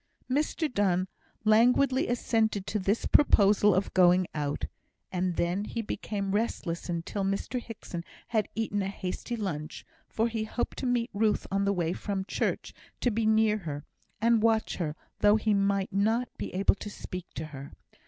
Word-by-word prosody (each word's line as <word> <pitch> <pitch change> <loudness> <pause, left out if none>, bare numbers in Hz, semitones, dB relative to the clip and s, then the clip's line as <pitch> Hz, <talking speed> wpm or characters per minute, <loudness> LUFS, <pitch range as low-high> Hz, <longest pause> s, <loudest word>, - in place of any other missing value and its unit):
Mr 300 +4 0
Donne 185 -3 +2 0.4
languidly 250 +5 +4
assented 220 -4 +1
to 215 - -1
this 200 +4 0
proposal 205 -7 +5
of 190 +2 0
going 180 0 +5
out; 145 -1 -2 0.5
and 180 -1 -1
then 175 +4 0
he 230 +2 -4
became 200 -2 -3
restless 195 -5 -2
until 175 +4 -2
Mr 195 +6 -1
Hickson 205 -7 -7 0.3
had 220 -3 +1
eaten 210 -2 -1
a 190 - -1
hasty 195 +4 -4
lunch, 165 -8 -4 0.2
for 225 +1 +1
he 225 -2 -2
hoped 240 - -3
to 260 - -2
meet 245 -1 0
Ruth 210 +1 +1
on 200 +1 +1
the 200 - +2
way 170 -2 0
from 195 -1 -3
church, - - -2 0.3
to 245 - +1
be 220 0 0
near 220 -1 +3
her, 145 -6 -6 0.3
and 230 +1 +3
watch 225 -1 +2
her, 155 -4 -2 0.2
though 210 0 +6
he 220 -1 +2
might 200 -1 +1
not 225 +5 +1
be - - -5
able 195 +1 +4
to 210 - -7
speak 180 -3 -7
to 155 - -4
her. 140 0 -8
205 Hz, 170 wpm, -29 LUFS, 185-225 Hz, 0.5 s, though